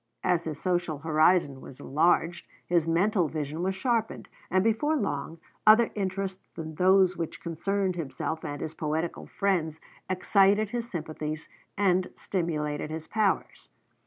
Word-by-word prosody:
As 170 -1 +1
his 155 -2 -4
social 175 -4 0
horizon 155 -2 +2
was 130 - -12
enlarged, 165 +3 +1 0.2
his 170 -2 +1
mental 180 +1 +2
vision 150 +1 -4
was 190 +1 0
sharpened; 230 +1 -1 0.2
and 185 +1 +3
before 225 +8 +2
long, 165 - -2 0.3
other 220 +2 +7
interests 190 -1 -3
than 160 -1 -6
those 185 +2 +4
which 165 -2 -5
concerned 190 +3 -1
himself 160 0 -4
and 145 0 -5
his 160 - -4
poetical 160 +2 -3
friends 170 -6 0 0.3
excited 200 +2 +3
his 240 -1 -3
sympathies 155 -3 -5 0.3
and 185 -2 +2
stimulated 150 -5 -2
his 160 0 -6
powers. 215 -3 -1
175 Hz, 135 wpm, -28 LUFS, 155-195 Hz, 0.3 s, other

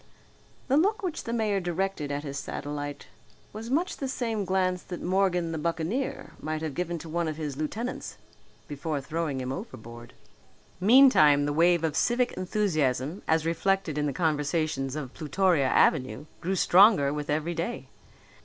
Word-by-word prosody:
The 275 +1 +3
look 405 +6 +2
which 345 -4 -3
the 230 - -3
mayor 215 -4 +1
directed 175 -4 -2
at 145 +1 -3
his 140 -1 -5
satellite 145 0 -5 0.5
was 220 +2 -7
much 330 +8 0
the 275 - -3
same 230 -6 -2
glance 185 -1 0
that 175 - -7
Morgan 180 -2 +1
the 160 - -3
buccaneer 170 - -2
might 155 0 -3
have 155 -3 -3
given 175 +2 -2
to 165 - -9
one 170 +1 -1
of 155 -1 -4
his 150 -4 -4
lieutenants 210 - -4 0.5
before 145 +1 -3
throwing 150 0 -3
him 130 0 -3
overboard. 120 - -9 0.6
Meantime 190 - +6
the 145 - -1
wave 170 +2 +3
of 155 -2 0
civic 245 +5 +2
enthusiasm 165 - -1
as 160 0 +2
reflected 170 0 0
in 150 0 0
the - - 0
conversations 150 -3 -1
of 135 -4 -5
Plutoria 160 -2 +1
Avenue 130 -2 +2
grew 190 +3 -1
stronger 180 -6 +5
with 150 0 -5
every 155 +3 0
day. 170 +8 -4
165 Hz, 160 wpm, -27 LUFS, 145-195 Hz, 0.6 s, Meantime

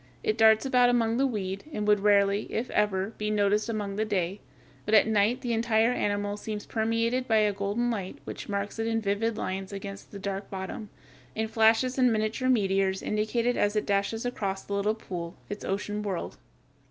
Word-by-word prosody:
It 215 - +1
darts 220 0 +5
about 250 -2 +4
among 230 -1 +2
the 275 +1 +3
weed, 195 -5 -3
and 210 -7 -3
would 210 -1 +5
rarely, 200 0 +3
if 240 +3 -2
ever, 205 0 0
be 210 0 -1
noticed 210 +1 +2
during 205 -3 -3
the 215 - +1
day; 195 -2 -1 0.4
but 215 - +2
at 215 - +7
night 220 +3 +2
the 240 -3 -1
entire 225 0 +2
animal 205 -2 -1
seems 210 0 -5
permeated 230 +3 0
with 215 -2 +4
a 205 - -4
golden 205 +5 -1
light 195 -5 -4
which - - -7
marks 200 +2 -3
it 225 - 0
in 225 0 +1
vivid 215 +2 -1
lines 190 -1 -4
against 195 0 -7
the 200 - -7
dark 195 0 -4
bottom, 195 +2 -6 0.5
and 220 0 -2
flashes 225 +4 +3
and 250 -2 +5
miniature 220 +4 0
meteors 195 -5 +2
indicate 215 +3 -1
it 245 0 +2
as 205 +1 +1
it 210 - 0
dashes 200 +3 0
across 195 -6 -2
the 200 - -6
little 205 +2 +1
pool, 175 -6 -6 0.2
its 205 - -5
ocean 205 +2 -2
world. 200 -4 -4
210 Hz, 195 wpm, -28 LUFS, 200-225 Hz, 0.5 s, at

